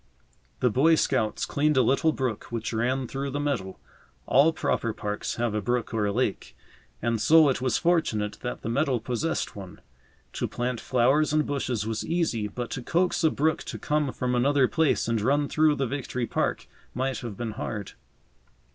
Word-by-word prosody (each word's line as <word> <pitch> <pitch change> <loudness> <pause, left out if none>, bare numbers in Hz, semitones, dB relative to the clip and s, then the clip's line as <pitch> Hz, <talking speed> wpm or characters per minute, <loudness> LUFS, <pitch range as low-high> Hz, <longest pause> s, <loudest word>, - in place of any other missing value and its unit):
The 125 - +3
Boy 155 +8 +4
Scouts 120 -8 0
cleaned 150 0 +1
a 130 - +5
little 135 +6 +3
brook 130 -7 -3
which 115 -1 -4
ran 125 +3 0
through 135 +2 -4
the 140 +2 -3
meadow. 125 -11 -2 0.5
All 140 +5 +5
proper 115 -7 -1
parks 105 0 -4
have 120 -2 -1
a 105 - -1
brook 120 +3 -1
or 105 -2 +1
a - - 0
lake, 110 -1 -2 0.5
and 115 -1 0
so 160 -2 +6
it 130 - -1
was 130 -1 +1
fortunate 110 -12 0
that 125 - -5
the - - -4
meadow 135 +1 +1
possessed 125 +8 -2
one. 95 -3 -9 0.5
To - - -2
plant 125 -1 -3
flowers 135 +5 +2
and 155 -1 +2
bushes 125 -6 -2
was 110 0 -2
easy, 160 -11 0
but 120 +3 -6
to 135 - -4
coax 175 +7 0
a 160 - +5
brook 155 +2 0
to - - -5
come 150 -2 0
from 125 0 -2
another 135 +2 +3
place 160 -5 +1
and 115 -2 0
run 140 +6 +2
through 155 0 +3
the 135 -1 -1
Victory 125 -1 -3
Park - - -1 0.3
might 130 0 -1
have 115 -5 -7
been 115 -2 -3
hard. 105 -2 -5
125 Hz, 185 wpm, -26 LUFS, 115-145 Hz, 0.5 s, so